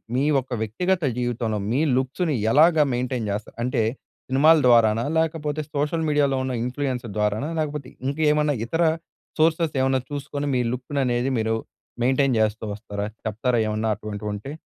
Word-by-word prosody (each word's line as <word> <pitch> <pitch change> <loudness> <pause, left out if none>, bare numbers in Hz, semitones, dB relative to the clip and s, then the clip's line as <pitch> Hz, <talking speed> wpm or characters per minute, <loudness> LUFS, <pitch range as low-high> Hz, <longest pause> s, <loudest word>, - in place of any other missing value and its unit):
మీ 135 +3 +2 0.2
ఒక్క 130 - -20
వ్యక్తిగత 180 - 0 0.2
జీవితంలో, 120 -3 -1
మీ 135 - +2 0.2
లుక్స్‌ని 140 +4 0 0.2
ఎలాగా 160 +1 +6
మెయింటైన్ 125 -2 -2
జేస్తా 105 +1 -4
అంటే 125 -2 +1 0.5
సినిమాల 150 +5 +6
ద్వారానా, 115 -1 +5
లేకపోతే 155 -2 -1
సోషల్ 150 +3 0
మీడియాలో 145 -3 +2
ఉన్న 130 -1 -2
ఇన్‌ఫ్లూయెన్స్ 125 -1 -2
ద్వారానా, 105 +7 0
లేకపోతే 150 -4 -3 0.2
ఇంకేమన్నా 150 +1 +2
ఇతర 165 +8 0 0.6
సోర్సెస్ 160 0 +2
ఏమన్నా 130 0 +2
చూసుకొని 145 0 -4
మీ 125 - +2
లుక్కుననేది 125 -1 -1
మీరు 110 0 0 0.5
మెయింటైన్ 130 0 +2
జేస్తూ 110 0 0
వస్తారా? 100 -1 -5 0.2
చెప్తారా 115 +3 0
ఏమన్నా 110 +1 -1
అటువంటివుంటే? 105 +3 -6
130 Hz, 135 wpm, -24 LUFS, 115-150 Hz, 0.6 s, ఎలాగా